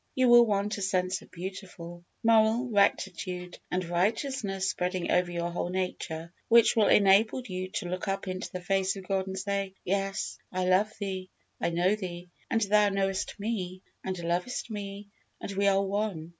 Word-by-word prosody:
You 255 -1 +4
will 240 0 +8
want 205 0 0
a - - -5
sense 185 -1 0
of - - -16
beautiful, 180 -1 -8 0.2
moral 225 +2 +4
rectitude 185 -3 0
and 180 0 -1
righteousness 195 +2 0
spreading 180 -1 -1
over 180 0 +2
your 170 0 -2
whole 175 0 -2
nature, 180 -2 -4
which 235 -1 +6
will 215 -3 +4
enable 210 +5 +5
you 185 -2 -4
to - - -2
look 185 +3 -4
up 195 0 -2
into 185 0 -4
the 180 - -5
face 195 +1 +1
of 190 -2 -9
God 195 -1 0
and 190 0 -5
say, 195 0 -2
"Yes, 195 +2 -1
I 185 0 -1
love 190 +4 +3
Thee, 190 -2 -4 0.3
I - - +1
know 175 +3 +2
Thee, 180 -3 -7 0.2
and 225 - +1
Thou 210 0 +4
knowest 195 -1 -1
me, 190 -4 -3 0.2
and 190 -1 -3
lovest 180 +8 -2
me, 200 -1 -6 0.3
and - - -6
we 200 +1 +1
are 195 0 +4
one. 195 -5 -2
195 Hz, 175 wpm, -29 LUFS, 180-205 Hz, 0.3 s, will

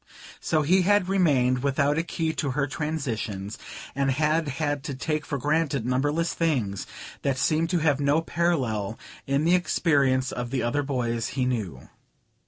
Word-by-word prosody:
So 155 -1 +1
he 185 +6 +4
had 205 0 +3
remained 140 -10 +2
without 140 +2 +1
a - - +3
key 165 -1 -2
to 150 -2 -2
her 140 - +2
transitions, 120 -9 -3 0.3
and 135 0 0
had 155 +4 +1
had 145 0 -2
to 140 -4 -4
take 150 +3 -2
for 140 - -2
granted 145 -2 0
numberless 145 +7 0
things 125 - -1 0.3
that 135 -2 0
seemed 155 +4 +1
to 180 - +1
have 145 -3 +3
no 145 +2 +3
parallel 130 - -1 0.3
in 140 +3 +1
the 170 - +4
experience 140 -7 +2
of 125 -1 -4
the 130 0 -1
other 130 +5 +1
boys 120 -4 -1
he 130 - +2
knew. 100 - -3
140 Hz, 165 wpm, -26 LUFS, 125-160 Hz, 0.3 s, he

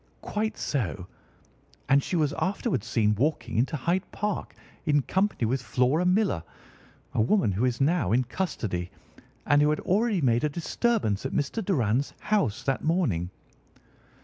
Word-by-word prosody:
"Quite 215 +1 -2
so. 105 - -2 0.8
And 140 +1 +5
she 180 - -3
was 150 -3 +1
afterwards 185 - -1
seen 110 -3 +2
walking 145 +9 -1
into 130 +7 +1
Hyde 175 +7 -1
Park 210 -1 -3 0.3
in 145 -3 +2
company 190 - 0
with 125 +3 0
Flora 130 +8 +1
Millar, 190 - +2 0.7
a - - +2
woman 120 - +2
who 100 +7 0
is 125 -1 0
now 145 - +2
in 125 +3 +3
custody, 115 - -3 0.6
and 145 0 +4
who 150 - +4
had 150 - +1
already 210 +1 +1
made 120 -5 +2
a 150 - +2
disturbance 170 - 0
at 135 - -3
Mr. 150 +10 -1
Doran's 135 - 0
house 200 - 0
that 135 - -1
morning." 150 - +1
145 Hz, 150 wpm, -27 LUFS, 115-185 Hz, 0.8 s, And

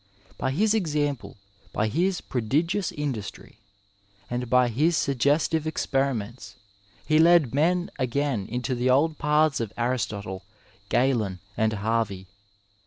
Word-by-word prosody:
By 130 - -2
his 205 +11 +2
example, 150 - -1 0.4
by 105 - +1
liis 175 - 0
prodigious 160 - 0
industry, 130 -9 -5 0.7
and 125 0 -3
by 125 0 +4
his 155 +8 +2
suggestive 145 +4 +1
experiments 135 -6 -2 0.5
he 155 0 +3
led 165 -6 +5
men 175 +5 +1
again 130 -4 -1
into 125 +2 -2
the 125 +1 0
old 150 +4 +2
paths 150 -1 +2
of 115 -3 -3
Aristotie, 105 -6 -2 0.5
Galen 115 -8 +1 0.2
and 110 0 +1
Harvey. 105 -2 -1
130 Hz, 115 wpm, -26 LUFS, 115-155 Hz, 0.7 s, led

